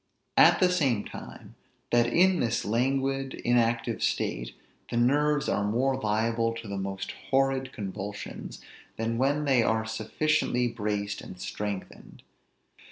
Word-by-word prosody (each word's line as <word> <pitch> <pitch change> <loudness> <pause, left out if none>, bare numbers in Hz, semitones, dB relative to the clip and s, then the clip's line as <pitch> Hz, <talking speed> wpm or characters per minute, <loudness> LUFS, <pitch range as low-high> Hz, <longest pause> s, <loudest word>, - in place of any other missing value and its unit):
At - - +7
the 180 -1 +4
same 135 -12 +1
time, - - -10 0.4
that 120 0 +4
in 180 +8 +4
this 115 -1 0
languid 135 +4 0
in 120 - 0
active 115 0 +1
state, - - -1 0.3
the 120 - -2
nerves 145 +4 +2
are 100 - +1
more 125 +6 +1
liable 115 0 0
to 115 -1 -7
the 100 -1 -4
most 95 0 -4 0.2
horrid 135 -1 +1
convulsions, 100 -1 -6 0.4
than 115 +1 -1
when 145 +3 +1
they 135 -4 +4
are 110 0 +1
sufficiently 125 +3 0
braced 105 -2 -3
and 90 - -10
strengthened. 100 0 -6
120 Hz, 135 wpm, -28 LUFS, 105-135 Hz, 0.4 s, At